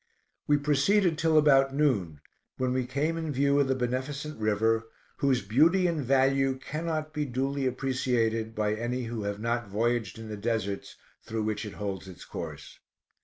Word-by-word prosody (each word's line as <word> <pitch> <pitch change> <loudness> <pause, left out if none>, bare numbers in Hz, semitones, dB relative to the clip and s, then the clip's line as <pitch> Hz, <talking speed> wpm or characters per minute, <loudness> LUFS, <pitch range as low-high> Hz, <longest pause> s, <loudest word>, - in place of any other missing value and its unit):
We 145 - +4
proceeded 155 +6 +3
till 160 -1 +3
about 135 -2 +5
noon, 100 - +1 0.4
when 130 -1 0
we 130 -1 -1
came 150 +6 -1
in 160 -2 -3
view 140 +1 +2
of 140 - +3
the 130 - +1
beneficent 130 +3 -3
river, 110 +1 +1 0.3
whose 135 -5 +2
beauty 160 - +4
and 165 -4 0
value 135 +1 +2
cannot 155 +2 -4
be 150 -1 -1
duly 135 +1 -1
appreciated 120 -4 0
by 105 0 +1
any 120 +3 -2
who 115 -1 -4
have 100 0 -3
not 115 0 -1
voyaged 115 -1 0
in 115 0 -8
the 105 -1 -5
deserts 100 -2 -2 0.3
through 110 -1 -3
which 110 0 -2
it 100 - -8
holds 100 -2 -5
its 90 -2 -11
course. - - -8
130 Hz, 170 wpm, -28 LUFS, 110-140 Hz, 0.4 s, about